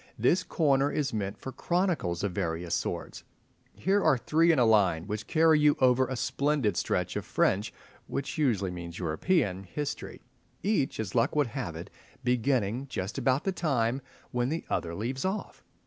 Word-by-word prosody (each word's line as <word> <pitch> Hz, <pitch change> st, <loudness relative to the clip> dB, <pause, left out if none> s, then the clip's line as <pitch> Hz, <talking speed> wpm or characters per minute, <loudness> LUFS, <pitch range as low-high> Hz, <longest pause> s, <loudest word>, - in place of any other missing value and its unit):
This 145 Hz, +11 st, +3 dB
corner 140 Hz, -5 st, +2 dB
is 140 Hz, -4 st, -1 dB
meant 100 Hz, -2 st, -3 dB
for 130 Hz, -, -7 dB
chronicles 160 Hz, -, -1 dB
of 100 Hz, -, 0 dB
various 85 Hz, -2 st, -2 dB
sorts. -, -, -3 dB, 0.5 s
Here 195 Hz, +2 st, +1 dB
are 155 Hz, -4 st, +4 dB
three 165 Hz, +7 st, +3 dB
in 160 Hz, -, +2 dB
a 125 Hz, -, +5 dB
line, 95 Hz, -7 st, +3 dB
which 105 Hz, +1 st, -4 dB
carry 160 Hz, -1 st, +4 dB
you 150 Hz, -1 st, +4 dB
over 130 Hz, 0 st, +4 dB
a 130 Hz, -, -3 dB
splendid 140 Hz, -, 0 dB
stretch -, -, -1 dB
of -, -, -2 dB
French 100 Hz, +3 st, +1 dB, 0.4 s
(which 140 Hz, -, -3 dB
usually 115 Hz, -, +1 dB
means 85 Hz, -1 st, -7 dB
European) 95 Hz, -, 0 dB
history, 145 Hz, +10 st, -5 dB, 0.4 s
each, 195 Hz, -, 0 dB
as 105 Hz, -4 st, -3 dB
luck 120 Hz, +4 st, +2 dB
would 145 Hz, -6 st, +1 dB
have 85 Hz, -, -4 dB
it, 85 Hz, +5 st, -8 dB, 0.3 s
beginning 125 Hz, 0 st, +1 dB
just 95 Hz, -4 st, -4 dB
about 130 Hz, +1 st, +2 dB
the 195 Hz, -, 0 dB
time 135 Hz, -8 st, 0 dB, 0.3 s
when 125 Hz, +1 st, 0 dB
the 160 Hz, +3 st, -3 dB
other 85 Hz, 0 st, -1 dB
leaves 125 Hz, +7 st, -3 dB
off. 190 Hz, +3 st, -3 dB
125 Hz, 170 wpm, -29 LUFS, 100-150 Hz, 0.5 s, a